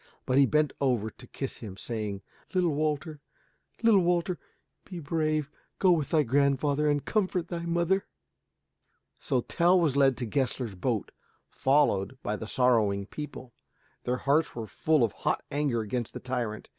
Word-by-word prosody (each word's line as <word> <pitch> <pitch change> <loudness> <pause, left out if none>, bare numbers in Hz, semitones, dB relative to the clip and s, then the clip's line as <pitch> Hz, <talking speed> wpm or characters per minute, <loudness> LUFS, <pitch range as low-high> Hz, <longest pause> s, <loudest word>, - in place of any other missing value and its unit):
But 130 +2 +3
he 140 - +6
bent 150 0 +2
over 120 -6 +1
him - - -20
to 125 - -12
kiss 135 +2 -5
him, 100 -4 -8
saying, 105 -4 -4 0.3
"Little 175 -4 +2
Walter, 150 0 -2 0.6
little 220 -4 +6
Walter, 175 0 0 0.4
be 180 -3 -8
brave. 155 -1 -1 0.3
Go 185 - +4
with 155 -5 +1
thy 155 -3 +3
grandfather 140 +3 +2
and 145 -1 0
comfort 185 -5 0
thy 170 -1 -4
mother." 175 +3 +1 1.1
So 125 - 0
Tell 175 +8 +3
was 155 -6 +1
led 135 -2 +4
to 125 - -3
Gessler's 125 -2 -1
boat, 105 +3 -2 0.4
followed 135 -5 +2
by 105 - -1
the 110 - -6
sorrowing 110 -6 +2
people. 130 -1 -8 0.5
Their 125 +1 -1
hearts 145 +4 +1
were 115 -2 -4
full 155 +4 +1
of 115 - +2
hot - - -2
anger 140 -5 0
against 115 +2 -3
the - - -4
tyrant. 120 -4 -3
140 Hz, 160 wpm, -28 LUFS, 120-160 Hz, 1.1 s, he